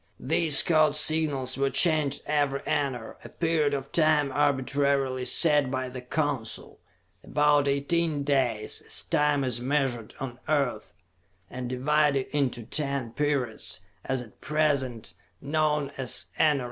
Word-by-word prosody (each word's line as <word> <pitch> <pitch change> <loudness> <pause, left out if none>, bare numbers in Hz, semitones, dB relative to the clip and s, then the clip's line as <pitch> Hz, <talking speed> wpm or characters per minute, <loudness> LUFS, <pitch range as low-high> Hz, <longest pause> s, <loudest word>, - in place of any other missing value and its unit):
These 155 0 +5
code 155 -3 +3
signals 150 -4 +1
were 135 0 +1
changed 150 0 +1
every 145 -2 0
enar, 130 -6 -3
a - - -10
period 160 -4 0
of 135 0 -6
time 155 -3 +2
arbitrarily 140 -2 0
set 150 -4 +4
by 130 -1 -3
the 125 0 -8
Council; 135 -3 -4 0.4
about 145 -1 +2
eighteen 145 +2 0
days, 130 -7 -1
as - - -2
time 150 -1 +1
is 125 -2 -2
measured 130 -4 -2
on 130 -2 -6
the 155 - +1
Earth, 130 -7 -2 0.6
and 125 -1 -6
divided 140 +1 +1
into 130 -5 -1
ten 140 -1 -3
periods, 135 -8 -3 0.2
as 130 -2 -2
at 110 - -19
present, 135 - -1 0.3
known 150 0 -1
as 130 -2 -1
enarens. 150 -2 +3
140 Hz, 135 wpm, -26 LUFS, 130-150 Hz, 0.6 s, These